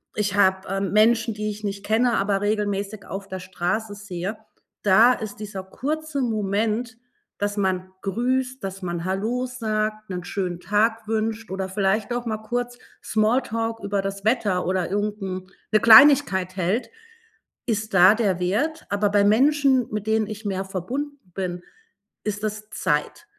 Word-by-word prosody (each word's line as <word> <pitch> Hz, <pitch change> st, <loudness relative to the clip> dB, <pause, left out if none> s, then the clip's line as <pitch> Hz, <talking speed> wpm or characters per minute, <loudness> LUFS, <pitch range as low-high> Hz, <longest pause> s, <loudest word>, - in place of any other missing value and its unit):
ich 205 Hz, -1 st, -1 dB
habe, 190 Hz, -1 st, +3 dB
ähm, 195 Hz, 0 st, -1 dB
Menschen, 225 Hz, +1 st, +4 dB
die 210 Hz, 0 st, -3 dB
ich 210 Hz, +1 st, -9 dB
nicht 200 Hz, 0 st, -4 dB
kenne, 235 Hz, +3 st, +2 dB
aber 195 Hz, 0 st, +1 dB
regelmäßig 205 Hz, -1 st, -2 dB
auf 195 Hz, 0 st, -6 dB
der 190 Hz, -1 st, -6 dB
Straße 190 Hz, +4 st, -2 dB
sehe, 200 Hz, 0 st, -5 dB, 0.5 s
da 220 Hz, +5 st, +6 dB
ist 215 Hz, -3 st, -6 dB
dieser 200 Hz, -3 st, -6 dB
kurze 290 Hz, +8 st, -3 dB
Moment, 220 Hz, +1 st, -1 dB, 0.4 s
dass 205 Hz, 0 st, -1 dB
man 185 Hz, -2 st, 0 dB
grüßt, 255 Hz, +5 st, -1 dB
dass 195 Hz, 0 st, -5 dB
man 175 Hz, -1 st, -3 dB
Hallo 220 Hz, +7 st, -1 dB
sagt, 215 Hz, -3 st, -2 dB
'nen 180 Hz, -1 st, -4 dB
schönen 180 Hz, -2 st, -3 dB
Tag 215 Hz, +5 st, +1 dB
wünscht 220 Hz, -1 st, -2 dB
oder 190 Hz, 0 st, -2 dB
vielleicht 200 Hz, +4 st, 0 dB
auch 245 Hz, 0 st, -3 dB
mal 215 Hz, -1 st, -1 dB
kurz 245 Hz, +2 st, -3 dB, 0.3 s
Small 220 Hz, +4 st, +2 dB
Talk 225 Hz, -1 st, -3 dB
über 200 Hz, 0 st, 0 dB
das 195 Hz, 0 st, -4 dB
Wetter 210 Hz, -6 st, +1 dB
oder 185 Hz, -2 st, 0 dB
irgend 205 Hz, +1 st, -1 dB
'n 185 Hz, -1 st, -5 dB, 0.2 s
'ne 215 Hz, -, +5 dB
Kleinigkeit 220 Hz, -6 st, +7 dB
hält, 190 Hz, +7 st, -1 dB, 0.7 s
ist 215 Hz, -3 st, -2 dB
da 185 Hz, +2 st, +8 dB
der 200 Hz, -6 st, 0 dB
Wert. 265 Hz, -, -1 dB
Aber 205 Hz, 0 st, +1 dB
bei 205 Hz, 0 st, +3 dB
Menschen, 265 Hz, +3 st, +4 dB
mit 210 Hz, 0 st, -3 dB
denen 220 Hz, -1 st, +2 dB
ich 215 Hz, +1 st, -7 dB
mehr 195 Hz, -1 st, -2 dB
verbunden 255 Hz, -, -4 dB, 0.2 s
bin, 180 Hz, -2 st, -4 dB, 0.6 s
ist 210 Hz, 0 st, -3 dB
das 215 Hz, 0 st, -4 dB
Zeit. -, -, -1 dB
210 Hz, 160 wpm, -24 LUFS, 195-225 Hz, 0.7 s, da